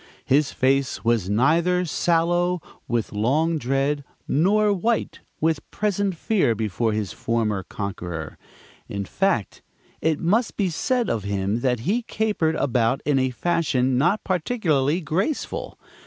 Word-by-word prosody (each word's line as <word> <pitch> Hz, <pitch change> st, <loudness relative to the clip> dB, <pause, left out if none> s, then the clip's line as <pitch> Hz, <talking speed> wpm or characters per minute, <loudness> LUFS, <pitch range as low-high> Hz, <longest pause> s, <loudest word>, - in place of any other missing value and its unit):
His 145 Hz, +2 st, +3 dB
face 135 Hz, -2 st, 0 dB
was 115 Hz, -5 st, +2 dB
neither 165 Hz, -, +2 dB
sallow 175 Hz, +2 st, +1 dB, 0.3 s
with 120 Hz, -2 st, -1 dB
long 150 Hz, +10 st, +1 dB
dread, 135 Hz, +3 st, 0 dB, 0.2 s
nor 205 Hz, +7 st, +3 dB
white 220 Hz, +5 st, -1 dB, 0.2 s
with 160 Hz, -1 st, 0 dB
present 200 Hz, -2 st, -1 dB
fear 185 Hz, -, +1 dB
before 110 Hz, +1 st, -1 dB
his 105 Hz, -2 st, -2 dB
former 110 Hz, -4 st, -1 dB
conqueror. 90 Hz, -6 st, -6 dB, 0.5 s
In 100 Hz, -1 st, -3 dB
fact, 190 Hz, -, -1 dB, 0.4 s
it 160 Hz, -2 st, +1 dB
must 215 Hz, +8 st, +1 dB
be 195 Hz, -4 st, +1 dB
said 245 Hz, +8 st, 0 dB
of 110 Hz, -4 st, -1 dB
him 100 Hz, +2 st, -1 dB
that 125 Hz, -2 st, 0 dB
he 210 Hz, -, 0 dB
capered 210 Hz, -8 st, 0 dB
about 125 Hz, -1 st, +1 dB
in 145 Hz, -2 st, +2 dB
a 130 Hz, 0 st, +1 dB
fashion 130 Hz, -3 st, +1 dB
not 175 Hz, +11 st, +2 dB
particularly 170 Hz, -, +1 dB
graceful. 180 Hz, -, -2 dB
150 Hz, 130 wpm, -23 LUFS, 115-180 Hz, 0.5 s, His